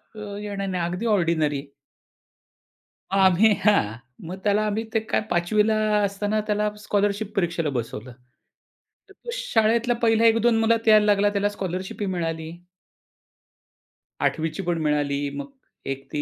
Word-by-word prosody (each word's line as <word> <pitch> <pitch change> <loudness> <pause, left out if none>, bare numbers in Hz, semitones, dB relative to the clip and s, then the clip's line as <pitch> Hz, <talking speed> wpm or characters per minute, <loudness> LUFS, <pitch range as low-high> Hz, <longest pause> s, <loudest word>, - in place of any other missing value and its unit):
अ, 205 -1 -7
येणार 200 -1 -4
नाही 180 -2 -2
अगदी 180 +6 -3
ऑर्डिनेरी. 160 -5 0 1.5
आम्ही, 195 +2 +5
हां. 110 - +3 0.3
मग 185 +2 -6
त्याला 210 +1 +2
आम्ही 215 +2 -1
ते 225 - +3
काय 220 - -1
5वी 180 +5 +2
ला 220 - +2 0.3
असताना 205 +2 -1
त्याला 210 0 +1
स्कॉलरशिप 205 0 -1
परीक्षेला 170 -4 0
बसवलं. 120 -2 -5 1.0
तर - - -15
तो 475 - -13
शाळेतला 235 - +1
पहिला 225 -1 +3
1-2 230 0 +4
मुलात 225 0 +1
यायला 215 -1 +6
लागला, 205 0 +3
त्याला 205 0 0
स्कॉलरशिप 190 -1 -5
ही 205 - 0
मिळाली. 165 -3 -3 1.7
8वी 160 -1 0
ची 195 - -5
पण 175 -1 -1
मिळाली 145 -1 0
मग 145 - -7 0.4
एक 135 0 -6
ती 145 - -1
200 Hz, 140 wpm, -24 LUFS, 170-215 Hz, 1.7 s, यायला